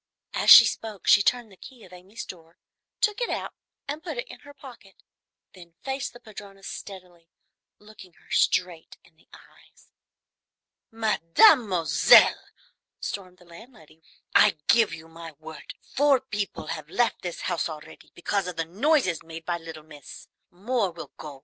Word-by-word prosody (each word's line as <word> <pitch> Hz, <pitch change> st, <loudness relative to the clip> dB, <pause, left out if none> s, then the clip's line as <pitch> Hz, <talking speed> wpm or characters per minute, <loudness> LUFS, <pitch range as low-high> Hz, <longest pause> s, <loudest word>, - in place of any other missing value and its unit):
As -, -, 0 dB
she -, -, +11 dB
spoke 215 Hz, -4 st, -5 dB
she 200 Hz, -, +6 dB
turned 240 Hz, +1 st, 0 dB
the -, -, -16 dB
key 245 Hz, +4 st, -15 dB
of 185 Hz, -, -16 dB
Amy's 190 Hz, +6 st, -10 dB
door, 165 Hz, -1 st, -13 dB, 0.4 s
took 425 Hz, +2 st, 0 dB
it 480 Hz, -, -1 dB
out -, -, -4 dB, 0.3 s
and 295 Hz, +2 st, -5 dB
put 320 Hz, -6 st, -7 dB
it 240 Hz, -, -5 dB
in -, -, -11 dB
her 285 Hz, 0 st, -15 dB
pocket, 240 Hz, -9 st, -15 dB, 0.5 s
then 170 Hz, -3 st, -16 dB
faced 270 Hz, 0 st, -4 dB
the 240 Hz, -, -14 dB
padrona 200 Hz, -3 st, -13 dB
steadily, 180 Hz, -4 st, -10 dB, 0.5 s
looking 210 Hz, -4 st, -16 dB
her -, -, -24 dB
straight 175 Hz, -3 st, 0 dB
in 160 Hz, -, -26 dB
the 160 Hz, -, -29 dB
eyes. -, -, -21 dB, 1.0 s
"Mademoiselle," 210 Hz, -, +4 dB, 0.5 s
stormed 185 Hz, -2 st, -7 dB
the 180 Hz, -, -21 dB
landlady, 170 Hz, -, -17 dB, 0.3 s
"I -, -, +5 dB
give 230 Hz, -3 st, +4 dB
you 160 Hz, 0 st, -10 dB
my 165 Hz, 0 st, -11 dB
word, 155 Hz, +1 st, -11 dB, 0.2 s
four 280 Hz, -1 st, +3 dB
people 210 Hz, -9 st, -5 dB
have 155 Hz, -2 st, -9 dB
left 235 Hz, +4 st, 0 dB
this 175 Hz, -2 st, -6 dB
house 175 Hz, -2 st, -2 dB
already 155 Hz, -1 st, -12 dB
because 190 Hz, +2 st, -2 dB
of 180 Hz, -, -6 dB
the 165 Hz, 0 st, -3 dB
noises 210 Hz, -, 0 dB
made 165 Hz, 0 st, -11 dB
by 175 Hz, -1 st, -2 dB
little 160 Hz, -2 st, -10 dB
miss. 150 Hz, -3 st, -13 dB, 0.2 s
More 205 Hz, +3 st, -2 dB
will 170 Hz, -1 st, -11 dB
go. 145 Hz, -3 st, -10 dB
185 Hz, 160 wpm, -25 LUFS, 165-230 Hz, 1.0 s, she